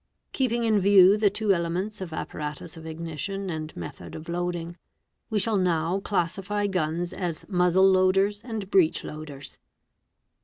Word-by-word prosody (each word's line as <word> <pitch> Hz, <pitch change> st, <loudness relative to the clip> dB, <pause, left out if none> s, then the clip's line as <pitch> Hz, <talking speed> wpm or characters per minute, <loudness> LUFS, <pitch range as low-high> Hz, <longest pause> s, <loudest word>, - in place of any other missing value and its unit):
Keeping 240 Hz, -3 st, 0 dB
in 220 Hz, -2 st, +3 dB
view 195 Hz, 0 st, +7 dB
the 210 Hz, -1 st, +3 dB
two 205 Hz, 0 st, +1 dB
elements 185 Hz, +4 st, -2 dB
of 180 Hz, -3 st, -5 dB
ot -, -, -4 dB
paratus 150 Hz, +2 st, -6 dB
of 160 Hz, 0 st, -10 dB
ignition 170 Hz, +4 st, -4 dB
and 155 Hz, -1 st, -6 dB
method 85 Hz, 0 st, -8 dB
of 155 Hz, -, -9 dB
loading, 175 Hz, 0 st, -3 dB, 0.5 s
we 220 Hz, -, 0 dB
shall 210 Hz, +1 st, +2 dB
now 175 Hz, 0 st, +1 dB
classify 195 Hz, +2 st, -1 dB
guns 175 Hz, -2 st, -1 dB
as 170 Hz, -4 st, -4 dB
muzzle 180 Hz, 0 st, +4 dB
loaders 195 Hz, +2 st, +3 dB
and 220 Hz, -5 st, -5 dB
breech 175 Hz, -5 st, +3 dB
loaders. 150 Hz, -2 st, -8 dB
185 Hz, 150 wpm, -26 LUFS, 165-200 Hz, 0.5 s, view